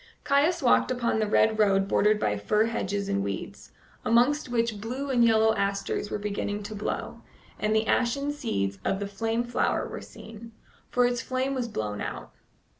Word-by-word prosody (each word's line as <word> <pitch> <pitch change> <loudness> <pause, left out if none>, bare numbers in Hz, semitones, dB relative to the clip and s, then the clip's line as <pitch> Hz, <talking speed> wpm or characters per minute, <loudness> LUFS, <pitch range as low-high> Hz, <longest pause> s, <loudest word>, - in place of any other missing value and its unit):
Caius 295 +4 +2
walked 245 - +4
upon 240 -3 0
the 215 - +1
red 220 +1 +3
road 195 -2 +3
bordered 210 +1 +3
by 105 - 0
fir 210 - +1
hedges 205 -3 -2
and 100 0 0
weeds, 100 -1 -6 0.3
amongst 245 +6 +3
which 230 -3 -1
blue 260 +5 -4
and 245 -2 +4
yellow 220 -1 +4
asters 200 0 -2
were - - -2
beginning 205 0 -3
to 210 +1 -6
blow, 210 0 -4 0.4
and 215 +1 +1
the 220 0 +2
ashen 265 +6 +1
seeds 100 - -2
of 195 - 0
the 200 - -2
flame 225 +4 -1
flower 240 0 0
were - - -7
seen, 225 +1 -12 0.4
for 250 0 +3
its 245 -1 0
flame 260 +1 -1
was 250 -3 -2
blown 105 - -4
out. - - -6
220 Hz, 180 wpm, -27 LUFS, 205-245 Hz, 0.4 s, walked